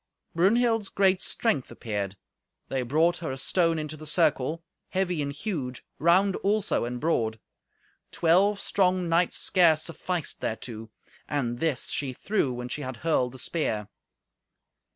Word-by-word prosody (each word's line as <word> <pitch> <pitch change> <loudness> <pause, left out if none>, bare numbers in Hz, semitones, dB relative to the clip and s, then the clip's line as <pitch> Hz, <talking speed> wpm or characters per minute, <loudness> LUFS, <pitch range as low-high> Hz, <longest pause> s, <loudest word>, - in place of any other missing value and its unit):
Brunhild's 225 +4 +3
great 190 -1 +3
strength 150 - 0
appeared. 100 -3 -4 0.5
They 135 - -1
brought 160 +8 +2
her 165 - -4
a 130 - -5
stone 165 +4 +2
into 155 0 -4
the 155 0 -8
circle, 155 0 +1 0.3
heavy 180 -4 0
and 140 -1 -2
huge, 145 - -4
round 185 +4 +4
also, 205 - +1
and 125 +1 -4
broad. 115 -8 0 0.7
Twelve 195 +5 +3
strong 185 -2 +2
knights 170 +1 +2
scarce 165 -4 +4
sufficed 170 0 -3
thereto. 110 0 -5 0.4
And 120 -5 -1
this 160 -6 0
she 135 -3 -2
threw 190 - 0
when 125 0 -5
she 135 +4 -4
had 130 -3 -5
hurled 130 -6 +2
the - - -9
spear. 110 -6 -2
160 Hz, 140 wpm, -27 LUFS, 130-180 Hz, 0.7 s, round